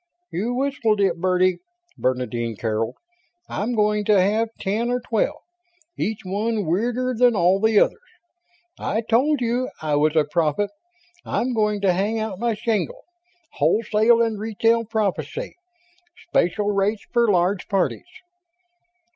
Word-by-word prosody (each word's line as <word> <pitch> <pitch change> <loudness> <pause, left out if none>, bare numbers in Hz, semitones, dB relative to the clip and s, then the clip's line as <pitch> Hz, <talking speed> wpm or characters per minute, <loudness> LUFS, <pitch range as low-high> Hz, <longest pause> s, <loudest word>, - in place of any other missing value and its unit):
"You 225 +8 -2
whistled 250 -5 0
it, 185 -4 +1
birdie!" 185 0 +2 0.4
Bernadine 125 -3 -2
caroled. 110 +1 -2 0.5
"I'm 230 +5 -2
going 210 -1 +2
to 210 -2 +4
have 215 +4 +2
ten 215 +4 -1
or 245 0 0
twelve, 230 -3 -1 0.6
each 220 0 -2
one 210 +2 -1
weirder 240 +9 0
than 245 0 +4
all 185 +1 +3
the 220 0 +4
others. - - +2 0.8
I 220 - -1
told 255 +6 +2
you 245 +2 0
I 155 -1 -2
was 155 +1 +2
a 155 - +5
prophet 165 +5 0 0.5
I'm 250 +1 -1
going 210 -2 0
to 190 -2 +3
hang 205 +5 0
out 215 -4 -3
my 235 -1 0
shingle. 230 - -2 0.5
Wholesale 225 +2 +3
and 225 -2 -2
retail 225 +2 +1
prophecy; 220 - -2 0.8
special 205 +4 +1
rates 200 +1 0
for 235 -2 +3
large 185 0 +1
parties." 195 -3 -1
210 Hz, 135 wpm, -22 LUFS, 185-230 Hz, 0.8 s, a